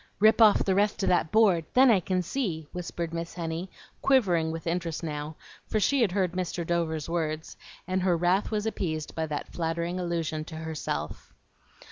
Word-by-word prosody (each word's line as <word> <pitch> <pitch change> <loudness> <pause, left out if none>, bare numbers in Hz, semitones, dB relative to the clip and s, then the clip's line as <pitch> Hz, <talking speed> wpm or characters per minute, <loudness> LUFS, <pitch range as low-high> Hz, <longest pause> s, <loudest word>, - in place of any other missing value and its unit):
"Rip 220 +3 +5
off 215 -2 +6
the 190 - +2
rest 205 +1 +1
of - - +2
that 175 -3 +2
board, 200 -7 +4
then 260 0 +7
I 205 - +5
can 185 +1 -1
see," 175 - -2
whispered 170 -2 -5
Miss 170 0 -5
Henny, 170 +1 -4 0.3
quivering 180 -12 +3
with 165 0 -6
interest 170 -1 -2
now; 150 0 -4 0.3
for 215 - 0
she 270 +7 +2
had 215 -6 +3
heard 185 -2 +1
Mr. 180 -1 -3
Dover's 160 -3 -1
words, 160 -2 -3 0.3
and 185 0 0
her 180 -2 +2
wrath 180 +4 +2
was 215 -1 -1
appeased 160 -8 -3
by 160 -1 -2
that 150 -1 -5
flattering 170 +2 -2
allusion 165 -3 -2
to 160 - -9
herself. 160 -4 -5
175 Hz, 180 wpm, -28 LUFS, 160-190 Hz, 0.3 s, then